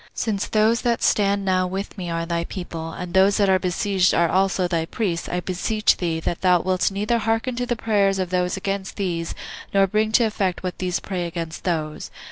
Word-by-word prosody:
since 210 Hz, -4 st, -1 dB
those 220 Hz, +2 st, +2 dB
that 235 Hz, -1 st, 0 dB
stand 200 Hz, -1 st, +2 dB
now 185 Hz, -1 st, +2 dB
with 195 Hz, +2 st, -5 dB
me 180 Hz, -4 st, -5 dB
are 165 Hz, 0 st, -2 dB
thy 170 Hz, 0 st, -1 dB
people, 165 Hz, -3 st, -6 dB
and 180 Hz, +1 st, -7 dB
those 190 Hz, +1 st, +4 dB
that 200 Hz, -, +3 dB
are 190 Hz, 0 st, +4 dB
besieged 185 Hz, +1 st, +1 dB
are 170 Hz, 0 st, +4 dB
also 190 Hz, 0 st, +2 dB
thy 170 Hz, -2 st, 0 dB
priests, 170 Hz, -1 st, -2 dB
I 180 Hz, -, -1 dB
beseech 210 Hz, +4 st, +1 dB
thee, 165 Hz, -3 st, -1 dB
that 170 Hz, -, -3 dB
thou 180 Hz, -2 st, +4 dB
wilt 185 Hz, -1 st, +1 dB
neither 210 Hz, +4 st, 0 dB
hearken 225 Hz, +3 st, 0 dB
to 245 Hz, 0 st, -2 dB
the 240 Hz, -, 0 dB
prayers 200 Hz, -4 st, +1 dB
of 185 Hz, -2 st, -2 dB
those 180 Hz, 0 st, 0 dB
against 195 Hz, 0 st, -3 dB
these, 170 Hz, -4 st, -2 dB, 0.4 s
nor 195 Hz, 0 st, +6 dB
bring 215 Hz, +3 st, 0 dB
to 235 Hz, -, +5 dB
effect 200 Hz, -5 st, -1 dB
what 180 Hz, -1 st, -4 dB
these 180 Hz, -1 st, -1 dB
pray 180 Hz, -3 st, -3 dB
against 165 Hz, -1 st, -6 dB
those." 155 Hz, -4 st, -2 dB
190 Hz, 210 wpm, -23 LUFS, 175-205 Hz, 0.4 s, nor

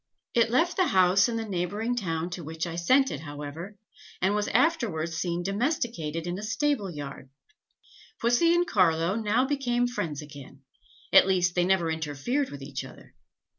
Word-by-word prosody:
It 230 Hz, -1 st, +3 dB
left 325 Hz, +9 st, +1 dB
the 370 Hz, -2 st, +3 dB
house 185 Hz, 0 st, +4 dB
in 235 Hz, -, -2 dB
the 225 Hz, 0 st, -2 dB
neighbouring 205 Hz, +6 st, -2 dB
town 170 Hz, -6 st, -2 dB
to 175 Hz, -1 st, -6 dB
which 160 Hz, +2 st, -4 dB
I 170 Hz, -1 st, -5 dB
sent 260 Hz, +11 st, +3 dB
it, 145 Hz, -, -4 dB
however, 150 Hz, +6 st, -8 dB, 0.4 s
and 190 Hz, +2 st, +2 dB
was 210 Hz, 0 st, 0 dB
afterwards 230 Hz, -, +1 dB
seen 170 Hz, +1 st, -2 dB
domesticated 195 Hz, -, -2 dB
in 175 Hz, +2 st, -3 dB
a -, -, -6 dB
stable 225 Hz, 0 st, 0 dB
yard. 145 Hz, -4 st, -8 dB, 0.9 s
Pussy 245 Hz, +9 st, +3 dB
and 350 Hz, 0 st, +2 dB
Carlo 170 Hz, -, +2 dB
now 225 Hz, +3 st, +1 dB
became 250 Hz, -4 st, 0 dB
friends 160 Hz, -, -3 dB
again; 140 Hz, -2 st, -12 dB, 0.5 s
at -, -, +8 dB
least, 180 Hz, -2 st, +2 dB
they 175 Hz, -1 st, +2 dB
never 180 Hz, -3 st, +2 dB
interfered 160 Hz, -, -2 dB
with 140 Hz, -1 st, -9 dB
each 140 Hz, 0 st, -5 dB
other. -, -, -14 dB
185 Hz, 170 wpm, -27 LUFS, 160-240 Hz, 0.9 s, at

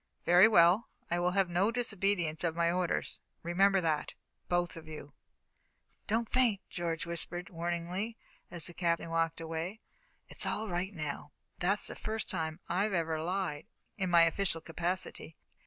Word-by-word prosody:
"Very 180 Hz, +4 st, +8 dB
well. 185 Hz, +1 st, +5 dB, 0.2 s
I 175 Hz, -, +2 dB
will 175 Hz, 0 st, +2 dB
have 195 Hz, -2 st, +4 dB
no 175 Hz, +4 st, +2 dB
disobedience 195 Hz, -9 st, 0 dB
of 165 Hz, -2 st, 0 dB
my 170 Hz, 0 st, +2 dB
orders 180 Hz, -1 st, -1 dB, 0.2 s
remember 195 Hz, +3 st, +3 dB
that, 155 Hz, -3 st, -1 dB, 0.4 s
both 175 Hz, -1 st, 0 dB
of 165 Hz, -1 st, -10 dB
you." 150 Hz, -2 st, -9 dB, 0.9 s
"Don't 225 Hz, +2 st, +1 dB
faint," 245 Hz, -6 st, +4 dB
George 165 Hz, -2 st, -2 dB
whispered, 170 Hz, +1 st, -4 dB
warningly, 175 Hz, +6 st, -3 dB, 0.3 s
as 170 Hz, -2 st, 0 dB
the 175 Hz, -, +3 dB
Captain 170 Hz, -1 st, 0 dB
walked 165 Hz, 0 st, 0 dB
away. 165 Hz, +5 st, -4 dB, 0.5 s
"It's -, -, -2 dB
all 220 Hz, +1 st, -1 dB
right 180 Hz, +1 st, -2 dB
now, 150 Hz, -4 st, -5 dB, 0.3 s
but 175 Hz, -, 0 dB
that's 200 Hz, +2 st, +1 dB
the -, -, -1 dB
first 220 Hz, 0 st, -3 dB
time 160 Hz, -2 st, -2 dB
I 195 Hz, +5 st, +1 dB
ever 165 Hz, -4 st, -1 dB
lied 180 Hz, -3 st, -2 dB, 0.3 s
in 185 Hz, -3 st, -1 dB
my 170 Hz, -1 st, +7 dB
official 165 Hz, 0 st, +1 dB
capacity." 170 Hz, 0 st, -2 dB
175 Hz, 155 wpm, -32 LUFS, 165-195 Hz, 0.9 s, Very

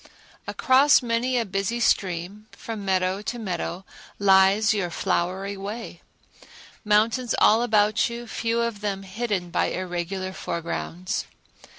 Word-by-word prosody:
Across 280 Hz, 0 st, +4 dB
many 240 Hz, +2 st, 0 dB
a 235 Hz, -, +1 dB
busy 195 Hz, +4 st, -2 dB
stream, 195 Hz, -1 st, 0 dB
from 220 Hz, -3 st, -7 dB
meadow 190 Hz, 0 st, 0 dB
to 240 Hz, +3 st, -4 dB
meadow, 185 Hz, -3 st, -4 dB, 0.3 s
lies 200 Hz, +2 st, +4 dB
your 195 Hz, -4 st, -1 dB
flowery 185 Hz, +4 st, -1 dB
way; 205 Hz, +4 st, -7 dB, 0.8 s
mountains 220 Hz, +3 st, +2 dB
all 220 Hz, +2 st, +5 dB
about 215 Hz, -1 st, +2 dB
you, 235 Hz, 0 st, -6 dB
few 230 Hz, 0 st, -1 dB
of 230 Hz, -3 st, -2 dB
them 195 Hz, -2 st, -3 dB
hidden 195 Hz, -3 st, -3 dB
by 175 Hz, -, +1 dB
irregular 185 Hz, +1 st, -4 dB
foregrounds. 170 Hz, +2 st, -4 dB
205 Hz, 120 wpm, -24 LUFS, 185-230 Hz, 0.8 s, all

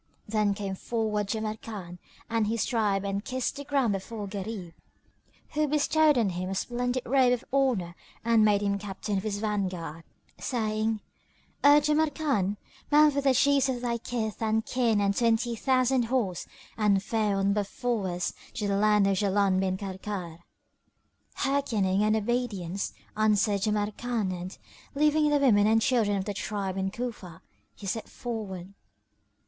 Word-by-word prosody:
Then 210 Hz, -2 st, +1 dB
came 195 Hz, -1 st, -4 dB
forward 210 Hz, 0 st, -2 dB
Jamrkan 215 Hz, -4 st, -5 dB, 0.3 s
and 225 Hz, -2 st, 0 dB
his 225 Hz, 0 st, 0 dB
tribe 205 Hz, -5 st, 0 dB
and 200 Hz, +1 st, -2 dB
kissed 255 Hz, +1 st, -2 dB
the 285 Hz, -, -5 dB
ground 275 Hz, -6 st, +1 dB
before 205 Hz, +2 st, -5 dB
Gharib, 195 Hz, -3 st, -6 dB, 0.8 s
who 305 Hz, 0 st, +1 dB
bestowed 300 Hz, 0 st, +3 dB
on 225 Hz, -5 st, +2 dB
him 180 Hz, +1 st, -4 dB
a 195 Hz, -, -3 dB
splendid 245 Hz, +4 st, -1 dB
robe 255 Hz, 0 st, +4 dB
of 245 Hz, -, -3 dB
honour 245 Hz, -11 st, +1 dB, 0.3 s
and 230 Hz, -2 st, +4 dB
made 205 Hz, -1 st, +3 dB
him 200 Hz, 0 st, 0 dB
captain 200 Hz, 0 st, -3 dB
of -, -, -7 dB
his 210 Hz, -2 st, -2 dB
vanguard, 185 Hz, -6 st, -3 dB, 0.4 s
saying, 220 Hz, -2 st, -1 dB, 0.6 s
"O 290 Hz, +1 st, +8 dB
Jamrkan, 295 Hz, -, +1 dB, 0.3 s
mount 300 Hz, 0 st, +6 dB
with 280 Hz, 0 st, -1 dB
the 265 Hz, -1 st, +4 dB
Chiefs 275 Hz, 0 st, +4 dB
of 250 Hz, -2 st, -2 dB
thy 235 Hz, -1 st, -1 dB
kith 220 Hz, -3 st, -3 dB
and 220 Hz, 0 st, +1 dB
kin 235 Hz, -4 st, +1 dB
and 200 Hz, 0 st, +1 dB
twenty 235 Hz, +1 st, +2 dB
thousand 255 Hz, 0 st, +2 dB
horse 225 Hz, -8 st, -1 dB, 0.3 s
and 200 Hz, -3 st, +3 dB
fare 215 Hz, -2 st, 0 dB
on 195 Hz, 0 st, +2 dB
before 210 Hz, +1 st, -1 dB
us 175 Hz, 0 st, -2 dB, 0.2 s
to 210 Hz, -, -2 dB
the 200 Hz, 0 st, +1 dB
land 210 Hz, -1 st, +4 dB
of 195 Hz, -1 st, +2 dB
Jaland 200 Hz, -2 st, +2 dB
bin 190 Hz, -1 st, 0 dB
Karkar." 190 Hz, -3 st, -6 dB, 1.0 s
"Hearkening 220 Hz, -9 st, +1 dB
and 215 Hz, +1 st, +3 dB
obedience," 210 Hz, -5 st, -2 dB, 0.2 s
answered 210 Hz, -1 st, +2 dB
Jamrkan 215 Hz, 0 st, -1 dB
and, 180 Hz, +1 st, -6 dB, 0.4 s
leaving 300 Hz, +1 st, +3 dB
the 295 Hz, -, +3 dB
women 215 Hz, -7 st, +4 dB
and 225 Hz, +1 st, +4 dB
children 225 Hz, -5 st, +2 dB
of 190 Hz, -, -3 dB
the 205 Hz, -, -3 dB
tribe 200 Hz, -2 st, -3 dB
in 190 Hz, 0 st, -1 dB
Cufa, 210 Hz, -7 st, -6 dB, 0.3 s
he 205 Hz, -, -11 dB
set 220 Hz, +3 st, -3 dB
forward. 200 Hz, -6 st, -6 dB
215 Hz, 155 wpm, -28 LUFS, 195-245 Hz, 1.0 s, O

